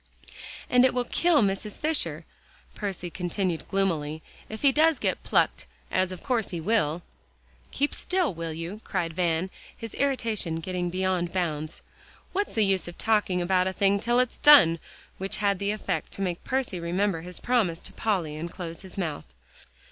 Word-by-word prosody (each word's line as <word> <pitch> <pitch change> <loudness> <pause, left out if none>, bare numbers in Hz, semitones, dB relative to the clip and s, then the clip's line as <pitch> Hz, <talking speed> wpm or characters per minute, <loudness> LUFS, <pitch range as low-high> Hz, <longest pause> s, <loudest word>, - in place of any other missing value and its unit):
"And 250 0 +5
it 260 -1 +3
will 250 - +2
kill 320 +2 +3
Mrs. 200 +1 -1
Fisher," 315 0 -1 0.5
Percy 190 -4 -4
continued 180 -1 -2
gloomily, 160 -6 -1 0.3
"if 220 +4 -7
he 280 - +6
does 315 +2 +4
get - - -1
plucked, - - +1 0.2
as 185 0 +1
of 185 - -8
course 245 -6 0
he 175 - -4
will." 170 -4 +1 0.7
"Keep 285 +2 0
still, 360 - +1
will 165 0 -4
you?" 165 +7 -6
cried 165 -1 -2
Van, 175 +1 0 0.3
his 230 -2 -7
irritation 225 -11 0
getting 180 +1 -2
beyond 185 -1 0
bounds. 155 -4 -3 0.5
"What's 405 +1 -1
the 220 -2 +4
use 195 -2 +1
of 175 - -9
talking 210 -5 +2
about 185 +1 +2
a 190 - -1
thing 200 +1 +2
till 240 +3 +2
it's 250 -1 0
done," 170 - +8 0.4
which 195 +1 -3
had 200 -2 +1
the 200 0 -1
effect 215 0 -2
to 195 - -3
make 175 -2 -3
Percy 255 -8 -1
remember 175 +1 0
his 180 +1 -6
promise 215 -10 +1
to - - -9
Polly 180 -9 -1
and 165 +3 -4
close 170 -3 -6
his 190 0 -6
mouth. 160 -6 -3
190 Hz, 170 wpm, -27 LUFS, 170-225 Hz, 0.7 s, done